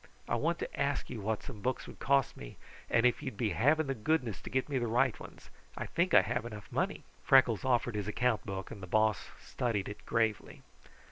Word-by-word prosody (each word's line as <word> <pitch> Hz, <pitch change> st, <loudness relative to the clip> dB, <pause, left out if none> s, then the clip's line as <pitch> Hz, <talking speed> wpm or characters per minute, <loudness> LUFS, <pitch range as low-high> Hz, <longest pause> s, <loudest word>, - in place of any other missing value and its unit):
I -, -, -2 dB
wanted -, -, 0 dB
to -, -, -10 dB
ask -, -, -1 dB
you 110 Hz, -, -5 dB
what 110 Hz, +1 st, -2 dB
some 110 Hz, -7 st, -9 dB
books 130 Hz, +3 st, -1 dB
would -, -, -12 dB
cost 140 Hz, -1 st, +2 dB
me, -, -, -10 dB, 0.3 s
and 115 Hz, -, +3 dB
if 125 Hz, -, +3 dB
you'd 100 Hz, -, -5 dB
be 110 Hz, -2 st, 0 dB
having 155 Hz, +6 st, +3 dB
the 135 Hz, -, -1 dB
goodness 120 Hz, -, -1 dB
to -, -, -8 dB
get 130 Hz, 0 st, 0 dB
me 140 Hz, -3 st, -1 dB
the 120 Hz, -, -1 dB
right 115 Hz, +2 st, +2 dB
ones. -, -, -12 dB, 0.3 s
I -, -, -3 dB
think 170 Hz, -3 st, +1 dB
I 100 Hz, -, +8 dB
have 120 Hz, +2 st, -2 dB
enough 105 Hz, -3 st, -9 dB
money." -, -, -1 dB, 0.2 s
Freckles 125 Hz, -6 st, +5 dB
offered 120 Hz, -2 st, +1 dB
his 105 Hz, -1 st, -3 dB
account 120 Hz, +1 st, +1 dB
book 95 Hz, -1 st, -5 dB
and 100 Hz, -, -8 dB
the 95 Hz, -, -7 dB
Boss 110 Hz, +2 st, +2 dB
studied 110 Hz, -6 st, -2 dB
it 105 Hz, -, -8 dB
gravely. 110 Hz, -3 st, -1 dB
115 Hz, 220 wpm, -32 LUFS, 105-130 Hz, 0.3 s, I